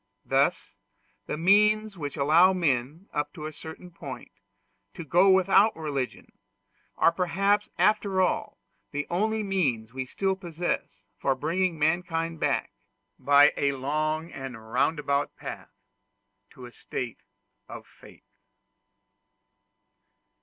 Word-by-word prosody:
Thus - - +1 0.5
the - - -3
means 210 +4 +3
which 145 -5 -6
allow 165 +7 +5
men, 155 +1 -1
up 145 0 -2
to 155 -4 -8
a 155 - -6
certain 160 +4 -10
point, 140 -7 -9 0.6
to - - -6
go 180 +6 +4
without 190 +3 +4
religion, 140 -5 -4 0.7
are - - +5
perhaps 195 +4 +1
after 205 -3 +2
all 185 -1 0 0.3
the 145 0 -3
only 215 +4 0
means 135 - -1
we 130 0 -4
still 190 +7 -1
possess 175 -2 -4 0.2
for 135 - +1
bringing 165 +5 -1
mankind 165 +1 -1
back - - 0 0.5
by 145 +1 +6
a 140 0 +1
long 155 +4 -2
and 120 -5 -9
roundabout 145 -2 0
path - - -8 0.8
to 125 - -12
a 120 - -11
state 120 -1 -6 0.5
of - - -9
faith. - - -18
165 Hz, 120 wpm, -27 LUFS, 140-190 Hz, 0.8 s, by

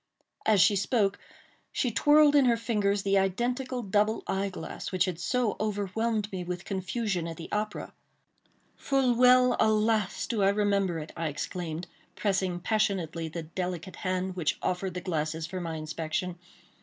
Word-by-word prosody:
As 215 -2 +5
she 205 - +5
spoke 200 0 +1 0.5
she 250 - 0
twirled 295 +4 +5
in 280 -2 +6
her 235 -2 +4
fingers 205 -4 0
the 195 0 +3
identical 245 +6 -1
double 210 +2 +1
eye 195 +1 -1
glass 160 -4 -6
which 185 -1 +2
had 180 -3 -4
so 240 +3 0
overwhelmed 210 +1 -1
me 185 -2 -4
with 180 0 -5
confusion 190 -2 -2
at 165 -1 -6
the 165 - -9
opera. 210 0 -3 0.8
"Full 270 -3 +1
well—alas! 225 -4 +3
do 225 -4 -1
I 195 - +5
remember 200 -3 +1
it," 155 0 -6
I 165 -1 -2
exclaimed, 160 +3 -4 0.3
pressing 190 -3 0
passionately 180 -6 0
the 165 +1 -5
delicate 180 +1 -5
hand 185 0 -2
which 170 -5 0
offered 185 0 -1
the 180 - -3
glasses 160 -2 -2
for 185 +2 -5
my 165 -2 -4
inspection. 160 +3 -3
195 Hz, 155 wpm, -28 LUFS, 175-220 Hz, 0.8 s, in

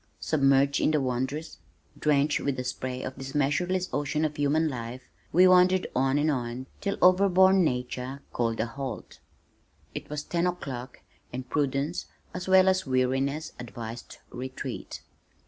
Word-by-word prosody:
Submerged 140 -2 +3
in - - +3
the 155 -1 +2
wondrous, 130 +4 -3 0.4
drenched 150 0 +2
with 140 -2 -1
the 125 - -2
spray 125 0 -4
of 130 0 -6
this 135 +1 -7
measureless 175 +6 +1
ocean 150 +2 0
of 150 -1 -2
human 145 +3 +2
life, 125 -2 -5 0.3
we 180 +3 +6
wandered 185 0 +5
on 135 +2 +2
and 150 +1 +2
on 125 -1 -3
till 200 - -2
overborne 190 0 +6
nature 125 0 -3
called 115 -1 -1
a 110 - +1
halt. 135 +1 -7 0.7
It - - -7
was 150 0 -4
ten 170 +2 0
o'clock 135 -8 -5 0.3
and 125 +1 -6
prudence 145 +4 -1 0.3
as 180 +1 -5
well 190 0 +6
as 185 -4 +2
weariness 135 +4 0
advised 115 -1 -8
retreat. 130 +1 -6
140 Hz, 145 wpm, -27 LUFS, 130-165 Hz, 0.7 s, we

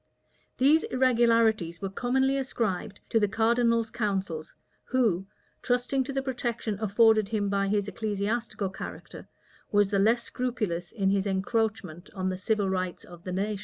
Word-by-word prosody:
These 295 +5 +5
irregularities 230 -8 +2
were 195 -1 -4
commonly 265 +5 +1
ascribed 220 -7 -2
to 225 - +3
the 205 - +2
cardinal's 230 +1 +2
counsels, 195 -7 -3 0.3
who, 215 -8 +1 0.3
trusting 250 +2 +1
to 275 - -4
the 270 0 -2
protection 235 -5 -3
afforded 215 0 +4
him 210 -2 0
by 200 0 +1
his 205 0 0
ecclesiastical 210 0 -2
character, - - -9 0.4
was 205 -1 +3
the 200 - +2
less 230 +4 +3
scrupulous 215 -9 -3
in 195 -3 +1
his 200 0 +1
encroachment 195 -3 -2
on 185 -1 -1
the 185 - -3
civil 210 -1 0
rights 185 -1 -2
of 175 -1 -13
the 185 - -4
nation. 200 +2 -2
215 Hz, 150 wpm, -28 LUFS, 195-235 Hz, 0.4 s, These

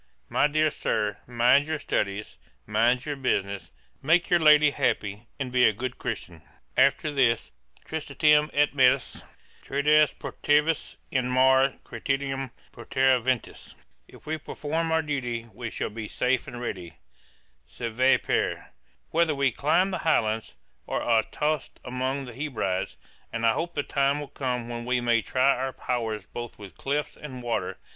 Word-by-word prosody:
My 145 - +3
dear 155 +1 +2
Sir, 105 -5 -1
mind 125 +4 +4
your 155 0 -1
studies, 100 - -3 0.3
mind 115 +4 +2
your 145 -1 -2
business, 100 -7 -1 0.3
make 165 +5 +2
your 175 - +5
lady 150 -1 +6
happy, 105 -3 -1
and 130 -2 -3
be 125 0 +3
a - - +4
good 125 +4 -5
Christian. 90 -9 -5 0.3
After 140 +2 +3
this, 125 -5 +1 0.3
'tristitiam 150 -1 +2
et 145 0 +2
metus 130 -1 +3 0.4
Trades 150 +2 +3
protervis 150 +2 0 0.2
in 125 -2 0
mare 130 +1 +4
Creticum 135 -1 -3 0.2
Portare 130 +1 +2
ventis.' 125 -1 -3 0.3
'If - - -17
we 155 +1 -3
perform 160 +2 -3
our 160 0 +2
duty, 125 -6 -3
we 115 +2 -5
shall - - -4
be 110 0 -6
safe 125 +3 0
and - - -8
steady, 95 -9 -5 0.7
"Sive 125 +3 +1
per," - - +1
&c., - - -16 0.5
whether 165 -2 +2
we 140 -2 +2
climb 170 - +2
the 185 - -2
Highlands, 110 - 0 0.3
or - - -2
are 115 -2 +4
tost 150 +4 -3
among 130 +2 -2
the 125 - -9
Hebrides; 115 -9 -2 0.3
and 115 0 -2
I 115 - +5
hope 170 +6 -3
the 145 - 0
time 140 +1 +1
will 145 -2 -7
come 125 -4 -3
when 120 0 -5
we 125 +1 +1
may 120 -1 +2
try 130 +4 +2
our 130 +1 -2
powers 110 -5 -3
both 120 -1 -7
with 100 -3 -11
cliffs 145 +2 -2
and 130 -4 -9
water. 120 -1 -2
130 Hz, 155 wpm, -26 LUFS, 115-145 Hz, 0.7 s, lady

